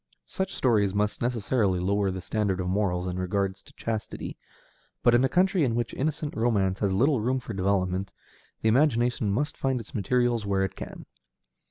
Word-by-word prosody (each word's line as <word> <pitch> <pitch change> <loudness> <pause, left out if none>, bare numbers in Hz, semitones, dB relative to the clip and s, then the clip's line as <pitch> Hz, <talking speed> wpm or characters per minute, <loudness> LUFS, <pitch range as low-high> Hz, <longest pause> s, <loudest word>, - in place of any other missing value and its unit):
Such 190 - -3
stories 105 -6 +2
must 105 0 0
necessarily 115 -5 +1
lower 100 +2 +1
the 95 -1 -4
standard 100 -3 -1
of 90 - -2
morals 90 -2 0
in 90 0 -3
regard 95 +1 0
to 95 - -17
chastity, 110 -2 -4 0.7
but 120 - +5
in 120 +2 +5
a 135 - +3
country 185 -1 +3
in 120 -4 +1
which 120 0 -2
innocent 150 +1 -2
romance 100 -5 +1
has 100 -2 +1
little 130 +6 +3
room 130 +4 +1
for 115 -2 -7
development, 95 0 0 0.5
the - - +3
imagination 120 -3 +2
must 145 +9 -1
find 135 -2 0
its 115 - -11
materials 120 +2 +1
where 100 -1 +1
it 95 - -3
can. - - -8
105 Hz, 180 wpm, -27 LUFS, 95-125 Hz, 0.7 s, but